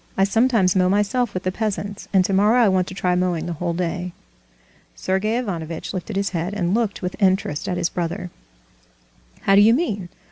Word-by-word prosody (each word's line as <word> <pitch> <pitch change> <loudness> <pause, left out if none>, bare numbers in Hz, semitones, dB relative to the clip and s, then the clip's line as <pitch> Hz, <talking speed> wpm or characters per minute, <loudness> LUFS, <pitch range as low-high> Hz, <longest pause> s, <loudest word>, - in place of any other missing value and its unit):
I 195 - +4
sometimes 220 -2 +2
mow 185 -1 +3
myself 210 +4 0
with 185 - -3
the 185 - 0
peasants, 205 0 -4
and 190 -2 +4
tomorrow 210 +6 +3
I 215 - +5
want 185 -1 +1
to 185 - -8
try 180 -1 0
mowing 180 -2 0
the 175 - -3
whole 170 +1 -2
day." 180 0 -3 0.8
Sergey 205 +5 -1
Ivanovitch 170 -9 -4
lifted 190 +2 -5
his 200 0 -1
head, 175 +3 -3
and 180 -2 0
looked 220 -4 -1
with 180 - -3
interest 190 -6 +1
at 180 - -1
his 175 -1 0
brother. 175 +1 -4 1.1
"How 195 - +3
do 200 - +7
you 225 +3 +6
mean? 205 - -2
190 Hz, 190 wpm, -22 LUFS, 180-205 Hz, 1.1 s, do